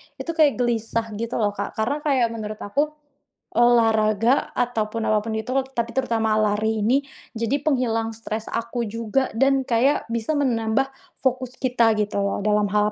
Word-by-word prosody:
itu 335 Hz, -, -4 dB
kayak 310 Hz, -4 st, +3 dB
gelisah 230 Hz, -2 st, -1 dB
gitu, 230 Hz, +1 st, -3 dB
loh, 210 Hz, -2 st, +1 dB
Kak, 205 Hz, -, -5 dB
karena 245 Hz, +7 st, -1 dB
kayak 275 Hz, -5 st, +2 dB
menurut 215 Hz, -2 st, -5 dB
aku, 280 Hz, +9 st, 0 dB, 0.7 s
olahraga 225 Hz, 0 st, +3 dB
ataupun 230 Hz, -2 st, -1 dB
apa 215 Hz, -1 st, +2 dB
pun 225 Hz, -, -3 dB
itu, 220 Hz, -, -7 dB, 0.2 s
tapi 235 Hz, -2 st, -1 dB
terutama 225 Hz, -4 st, +1 dB
lari 215 Hz, 0 st, +1 dB
ini, 255 Hz, +5 st, +4 dB, 0.3 s
jadi 230 Hz, +4 st, 0 dB
penghilang 230 Hz, -6 st, +1 dB
stres 220 Hz, 0 st, -5 dB
aku 235 Hz, +1 st, -2 dB
juga 230 Hz, +4 st, -1 dB
dan 270 Hz, +3 st, +3 dB
kayak 250 Hz, +3 st, +2 dB
bisa 235 Hz, +6 st, -1 dB
menambah 235 Hz, -2 st, +1 dB, 0.4 s
fokus 255 Hz, -1 st, -1 dB
kita 235 Hz, -4 st, +2 dB
gitu 210 Hz, -1 st, -1 dB
loh, 200 Hz, 0 st, 0 dB
dalam 210 Hz, -1 st, +3 dB
hal 210 Hz, +1 st, +2 dB
230 Hz, 160 wpm, -23 LUFS, 220-255 Hz, 0.7 s, ini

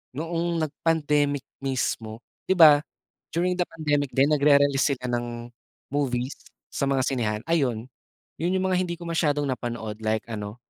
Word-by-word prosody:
noong 165 Hz, +1 st, -1 dB
nag-pandemic 145 Hz, -2 st, 0 dB, 0.2 s
mismo. 120 Hz, -4 st, -3 dB, 0.2 s
'Di 190 Hz, -, +3 dB
ba, 155 Hz, -4 st, +8 dB, 0.6 s
during 180 Hz, +1 st, 0 dB
the 175 Hz, -, +1 dB
pandemic 145 Hz, -3 st, 0 dB
din 140 Hz, +3 st, +4 dB
nagre-release 140 Hz, -1 st, +4 dB
sila 125 Hz, -1 st, -5 dB
ng 120 Hz, 0 st, -4 dB, 0.4 s
movies 130 Hz, -2 st, -1 dB, 0.4 s
sa 140 Hz, -, -1 dB
mga 135 Hz, -1 st, +1 dB
sinehan, 110 Hz, -5 st, -1 dB
ayun. 125 Hz, -6 st, -1 dB, 0.5 s
'Yun 175 Hz, +4 st, 0 dB
'yung 190 Hz, 0 st, +1 dB
mga 180 Hz, -, +2 dB
hindi 175 Hz, -2 st, -2 dB
ko 170 Hz, -, -11 dB
masyadong 150 Hz, -4 st, +1 dB
napanood 115 Hz, -4 st, -5 dB
like 110 Hz, 0 st, -1 dB
ano 105 Hz, -1 st, -5 dB
140 Hz, 145 wpm, -25 LUFS, 120-160 Hz, 0.6 s, ba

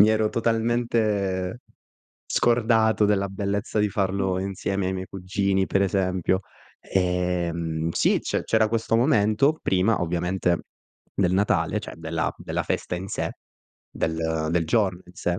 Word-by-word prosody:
mi 105 Hz, -, +8 dB
ero 110 Hz, -1 st, +2 dB
totalmente 115 Hz, -4 st, 0 dB, 0.7 s
scordato 110 Hz, -2 st, +3 dB
della 100 Hz, -1 st, +1 dB
bellezza 100 Hz, +2 st, -2 dB
di 105 Hz, 0 st, +3 dB
farlo 95 Hz, -1 st, 0 dB
insieme 95 Hz, 0 st, -2 dB
ai 95 Hz, -, -1 dB
miei 95 Hz, 0 st, -4 dB
cugini, 95 Hz, +1 st, -1 dB
per 100 Hz, -, +1 dB
esempio, 95 Hz, -1 st, +1 dB, 0.4 s
ehm, 85 Hz, -3 st, -1 dB
sì, -, -, +2 dB
c'è -, -, -2 dB
c'era 110 Hz, -1 st, +3 dB
questo 115 Hz, 0 st, 0 dB
momento 125 Hz, +3 st, +3 dB
prima, 95 Hz, +4 st, +2 dB
ovviamente, 90 Hz, +1 st, 0 dB, 0.6 s
del 90 Hz, -2 st, +2 dB
Natale, 95 Hz, -4 st, +1 dB
cioè -, -, -8 dB
della 80 Hz, 0 st, -2 dB
della -, -, -3 dB
festa -, -, -2 dB
in 95 Hz, +2 st, -6 dB
sé, -, -, -2 dB, 0.6 s
del 80 Hz, -1 st, -1 dB
del 85 Hz, -1 st, +1 dB
giorno 95 Hz, -1 st, +1 dB
in 90 Hz, -, -16 dB
sé, 90 Hz, 0 st, -2 dB
95 Hz, 135 wpm, -25 LUFS, 90-110 Hz, 0.7 s, mi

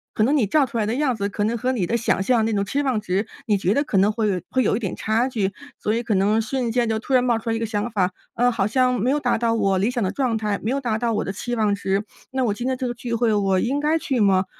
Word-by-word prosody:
可 215 Hz, -, +2 dB
能 270 Hz, +7 st, +3 dB
你 235 Hz, -, +3 dB
照 280 Hz, +7 st, +3 dB
出 235 Hz, -1 st, -5 dB
来 215 Hz, -, +1 dB
的 225 Hz, -, -1 dB
样 265 Hz, -3 st, +1 dB
子 200 Hz, -1 st, -2 dB
可 205 Hz, +1 st, -2 dB
能 230 Hz, +2 st, 0 dB
和 255 Hz, +3 st, 0 dB
你 215 Hz, -8 st, 0 dB
的 235 Hz, -, 0 dB
想 225 Hz, -4 st, 0 dB
象 230 Hz, +1 st, +2 dB
那 225 Hz, -, 0 dB
种 200 Hz, -1 st, 0 dB
期 280 Hz, +8 st, -1 dB
望 255 Hz, -5 st, +1 dB
值， 195 Hz, +3 st, -1 dB, 0.2 s
你 210 Hz, -2 st, +3 dB
觉 190 Hz, 0 st, +1 dB
得 285 Hz, -, +2 dB
可 235 Hz, -8 st, -1 dB
能 205 Hz, +2 st, +4 dB
会 210 Hz, -5 st, -1 dB
会 260 Hz, -, +1 dB
有 -, -, +2 dB
一 -, -, -3 dB
点 195 Hz, -6 st, -3 dB
差 225 Hz, +4 st, 0 dB
距， 200 Hz, -6 st, -1 dB, 0.3 s
所 215 Hz, -, 0 dB
以 235 Hz, +1 st, -1 dB
可 220 Hz, -3 st, 0 dB
能 210 Hz, +4 st, +2 dB
瞬 240 Hz, +1 st, -2 dB
间 240 Hz, -1 st, +1 dB
就 220 Hz, 0 st, 0 dB
突 265 Hz, -, -4 dB
然 250 Hz, -1 st, +5 dB
冒 240 Hz, -2 st, +2 dB
出 225 Hz, -, -5 dB
来 225 Hz, -, +1 dB
一 -, -, -2 dB
个 230 Hz, -, -1 dB
想 215 Hz, +1 st, -2 dB
法， 185 Hz, -4 st, +1 dB, 0.2 s
呃， 245 Hz, +1 st, +3 dB
好 210 Hz, -4 st, 0 dB
像 250 Hz, +2 st, +2 dB
没 245 Hz, +5 st, +1 dB
有 295 Hz, -, +1 dB
达 245 Hz, -5 st, +1 dB
到 230 Hz, 0 st, +1 dB
我 195 Hz, -3 st, +2 dB
理 205 Hz, +5 st, +1 dB
想 240 Hz, -4 st, -1 dB
的 185 Hz, -, 0 dB
状 250 Hz, -5 st, 0 dB
态， 210 Hz, -2 st, -1 dB
没 220 Hz, -, -1 dB
有 275 Hz, +1 st, -1 dB
达 230 Hz, -4 st, -1 dB
到 230 Hz, 0 st, 0 dB
我 215 Hz, -, 0 dB
的 195 Hz, -, -3 dB
期 240 Hz, +4 st, -4 dB
望 215 Hz, -2 st, +2 dB
值， 195 Hz, 0 st, -1 dB, 0.3 s
那 260 Hz, -1 st, 0 dB
我 215 Hz, -, +1 dB
今 240 Hz, +4 st, -4 dB
天 260 Hz, -1 st, 0 dB
这 255 Hz, -, -2 dB
个 240 Hz, -, -2 dB
聚 240 Hz, 0 st, -5 dB
会 230 Hz, -1 st, +2 dB
我 195 Hz, -2 st, +2 dB
应 265 Hz, +7 st, 0 dB
该 305 Hz, +2 st, +2 dB
去 265 Hz, -5 st, -1 dB
吗？ 195 Hz, -2 st, +3 dB
225 Hz, 345 characters per minute, -22 LUFS, 205-250 Hz, 0.3 s, 然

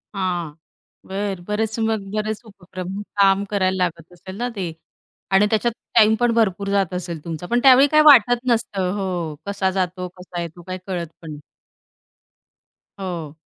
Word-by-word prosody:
हां. 175 Hz, -5 st, -2 dB, 0.5 s
बरं 195 Hz, -1 st, -3 dB
बरेच 220 Hz, +1 st, -1 dB
मग 220 Hz, -1 st, 0 dB
बरेच 215 Hz, 0 st, -2 dB
उपक्रम, 190 Hz, -1 st, -7 dB, 0.2 s
काम 195 Hz, 0 st, +4 dB
करायला 190 Hz, -2 st, +1 dB
लागत 170 Hz, -1 st, -4 dB
असेल 190 Hz, +2 st, -10 dB
ना 245 Hz, +2 st, -2 dB
ते 195 Hz, -3 st, -3 dB, 0.7 s
आणि 195 Hz, +2 st, +5 dB
त्याच्यात 225 Hz, +2 st, +1 dB, 0.2 s
टाईम 220 Hz, -1 st, +6 dB
पण 240 Hz, -1 st, +3 dB
भरपूर 200 Hz, -3 st, +1 dB
जात 195 Hz, -3 st, +1 dB
असेल 170 Hz, -4 st, -5 dB
तुमचा? 165 Hz, 0 st, -5 dB
पण 240 Hz, +5 st, +1 dB
त्यावेळी 270 Hz, +1 st, +8 dB
काही 305 Hz, -, +7 dB
वाटत 245 Hz, -3 st, +7 dB
नसतं. 205 Hz, -6 st, 0 dB
हो. 195 Hz, -, -2 dB, 0.4 s
कसा 200 Hz, -1 st, 0 dB
जातो, 180 Hz, 0 st, -2 dB
कसा 180 Hz, -1 st, -6 dB
येतो, 170 Hz, +1 st, -8 dB
काय 185 Hz, +1 st, -6 dB
कळत 180 Hz, -3 st, -3 dB, 0.2 s
पण 160 Hz, -, -8 dB
नाही. 150 Hz, -1 st, -9 dB, 1.6 s
हो. 170 Hz, -6 st, -5 dB
195 Hz, 155 wpm, -21 LUFS, 180-215 Hz, 1.6 s, त्यावेळी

